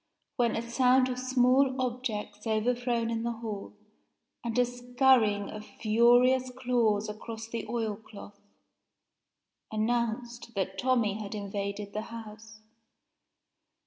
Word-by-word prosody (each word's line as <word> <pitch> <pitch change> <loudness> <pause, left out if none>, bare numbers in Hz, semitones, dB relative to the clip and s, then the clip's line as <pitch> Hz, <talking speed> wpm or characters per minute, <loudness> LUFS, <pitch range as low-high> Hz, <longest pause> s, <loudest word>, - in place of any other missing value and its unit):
when 240 -4 +1
a 235 +1 -3
sound 255 +1 +4
of 250 0 -3
small 255 +1 +3
objects 235 -4 -3
overthrown 235 +1 0
in 225 -1 -1
the 235 0 -1
hall, 215 -3 -7 0.7
and 235 -1 -3
a 250 - +5
scurrying 245 -4 +2
of 215 0 -7
furious 245 +4 +3
claws 230 -5 +1
across 220 +1 -7
the 230 0 -5
oil 225 -3 -1
cloth, 205 -1 -13 1.3
announced 235 +1 -2
that 190 0 -2
Tommie 225 -4 +1
had 210 +1 -6
invaded 200 0 -4
the 215 - -2
house. 220 -1 -10
230 Hz, 115 wpm, -29 LUFS, 215-245 Hz, 1.3 s, a